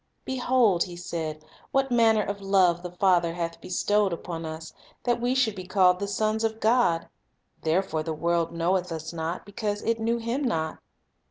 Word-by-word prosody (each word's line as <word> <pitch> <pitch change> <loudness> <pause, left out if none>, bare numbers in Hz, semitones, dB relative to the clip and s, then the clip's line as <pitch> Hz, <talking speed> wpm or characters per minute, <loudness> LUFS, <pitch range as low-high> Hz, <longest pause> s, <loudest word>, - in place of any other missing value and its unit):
"Behold," 250 -7 +2
he 175 -2 -9
said, 160 -3 -5 0.3
"what 270 -1 +1
manner 225 -3 +4
of 200 0 -4
love 185 -3 +3
the 180 - -5
Father 175 -2 +2
hath 170 -1 -4
bestowed 205 +2 +1
upon 165 -1 -5
us, 160 0 -7 0.3
that 240 -1 +1
we 245 +2 +1
should 250 -5 +2
be 185 -2 -7
called 180 -2 +4
the 200 - -2
sons 215 +2 0
of 220 0 -1
God; 220 -8 +2 0.5
therefore 160 0 0
the 160 +1 -4
world 170 +1 0
knoweth 175 +2 0
us 160 +1 -5
not, 165 +2 -4
because 205 +1 -3
it 230 0 0
knew 230 +1 +1
Him 235 +4 -2
not. 160 - -1
190 Hz, 175 wpm, -26 LUFS, 170-220 Hz, 0.5 s, manner